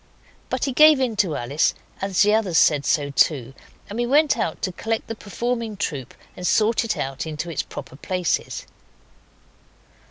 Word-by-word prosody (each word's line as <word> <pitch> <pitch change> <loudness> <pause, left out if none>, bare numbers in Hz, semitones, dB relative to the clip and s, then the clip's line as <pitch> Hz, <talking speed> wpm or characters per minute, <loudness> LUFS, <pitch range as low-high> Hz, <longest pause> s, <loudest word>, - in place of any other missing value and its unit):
But 255 0 -1
he 275 - -1
gave 305 +1 +7
in 250 -4 0
to 180 -7 +1
Alice, 140 +6 0 0.3
as 195 0 +2
the 210 +1 +3
others 200 -7 +1
said 145 -2 +4
so 145 -2 +1
too, 135 -1 +2 0.3
and 205 - -7
we 240 - 0
went 295 +3 +4
out 160 - -2
to 185 - 0
collect 225 +5 -3
the 225 - -5
performing 225 +1 -3
troop 140 - -4 0.2
and 180 - -3
sort 220 +2 +3
it 230 - -2
out 135 +3 -3
into 160 +2 -4
its 155 - -1
proper - - -9
places. 180 +4 -2
195 Hz, 170 wpm, -23 LUFS, 150-230 Hz, 0.3 s, gave